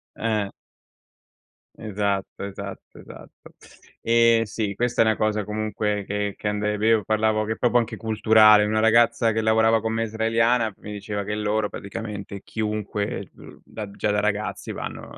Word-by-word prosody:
Eh. 105 Hz, -3 st, -1 dB, 1.3 s
Esatto, 100 Hz, -2 st, -3 dB
esatto, 100 Hz, -1 st, -8 dB
esatto. -, -, -14 dB, 0.5 s
Ehm, 115 Hz, 0 st, +4 dB
sì, 105 Hz, -1 st, -3 dB
questa 120 Hz, -1 st, +1 dB
è -, -, -1 dB
una 110 Hz, -1 st, +2 dB
cosa 105 Hz, -2 st, 0 dB
comunque 105 Hz, -1 st, -2 dB
che 105 Hz, 0 st, -2 dB
che -, -, -4 dB
ande 105 Hz, 0 st, -1 dB
è -, -, -3 dB
vero, 110 Hz, 0 st, +3 dB
parlavo 110 Hz, 0 st, +1 dB
che 110 Hz, +1 st, -2 dB
proprio 120 Hz, 0 st, +2 dB
anche 115 Hz, -1 st, 0 dB
culturale. 110 Hz, -1 st, +5 dB
Una 110 Hz, +1 st, +1 dB
ragazza 115 Hz, 0 st, +4 dB
che 110 Hz, -, -1 dB
lavorava 110 Hz, 0 st, +3 dB
con 110 Hz, +1 st, -2 dB
me, 115 Hz, 0 st, 0 dB
israeliana, 115 Hz, 0 st, +1 dB
mi 105 Hz, -, -9 dB
diceva 105 Hz, 0 st, -4 dB
che 105 Hz, +1 st, -4 dB
loro, 105 Hz, 0 st, -1 dB
praticamente 100 Hz, -1 st, -7 dB
chiunque, 105 Hz, -2 st, -3 dB
ehm, -, -, -10 dB
uhm, -, -, -15 dB
da 105 Hz, -2 st, -8 dB
già 100 Hz, +1 st, -2 dB
da 105 Hz, -, +1 dB
ragazzi 105 Hz, 0 st, -2 dB
vanno -, -, -7 dB
110 Hz, 160 wpm, -24 LUFS, 105-110 Hz, 1.3 s, culturale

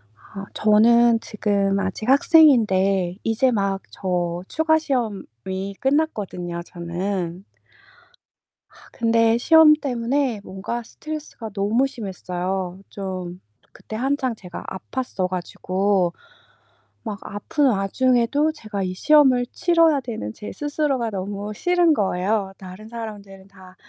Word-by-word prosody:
아 195 Hz, -, -10 dB
저는 230 Hz, +2 st, +5 dB
지금 200 Hz, -2 st, 0 dB
아직 200 Hz, +4 st, -3 dB
학생인데 205 Hz, -, +4 dB
이제 225 Hz, +3 st, +2 dB
막 195 Hz, -3 st, 0 dB
저 175 Hz, -2 st, -2 dB
추가 315 Hz, 0 st, +2 dB
시험이 200 Hz, -, -4 dB
끝났거든요 205 Hz, -, -1 dB
저는. 175 Hz, +1 st, -4 dB, 1.5 s
근데 230 Hz, 0 st, +2 dB
시험 320 Hz, +4 st, +7 dB
때문에 255 Hz, -4 st, -1 dB
뭔가 200 Hz, +5 st, -5 dB
스트레스가 300 Hz, -3 st, -8 dB
너무 215 Hz, +7 st, +1 dB
심했어요. 185 Hz, -5 st, -4 dB
좀 185 Hz, -2 st, -6 dB, 0.3 s
그때 220 Hz, -, -10 dB
한창 260 Hz, 0 st, -1 dB
제가 180 Hz, -4 st, -9 dB, 0.3 s
아팠어 245 Hz, -8 st, -2 dB
가지고 185 Hz, 0 st, -1 dB, 0.9 s
막 210 Hz, -3 st, -5 dB
아픈 275 Hz, +8 st, -1 dB
와중에도 245 Hz, +8 st, +1 dB
제가 210 Hz, -8 st, -5 dB
이 185 Hz, -1 st, -2 dB
시험을 260 Hz, +2 st, +4 dB
치뤄야 330 Hz, -4 st, +3 dB
되는 220 Hz, -, -5 dB
제 210 Hz, -, -8 dB
스스로가 290 Hz, -5 st, -1 dB
너무 200 Hz, +2 st, -4 dB
싫은 350 Hz, -, +3 dB
거예요. 195 Hz, -2 st, 0 dB
다른 190 Hz, +3 st, -11 dB
사람들은 205 Hz, -4 st, -8 dB
다 185 Hz, -1 st, -16 dB
210 Hz, 245 characters per minute, -22 LUFS, 190-255 Hz, 1.5 s, 시험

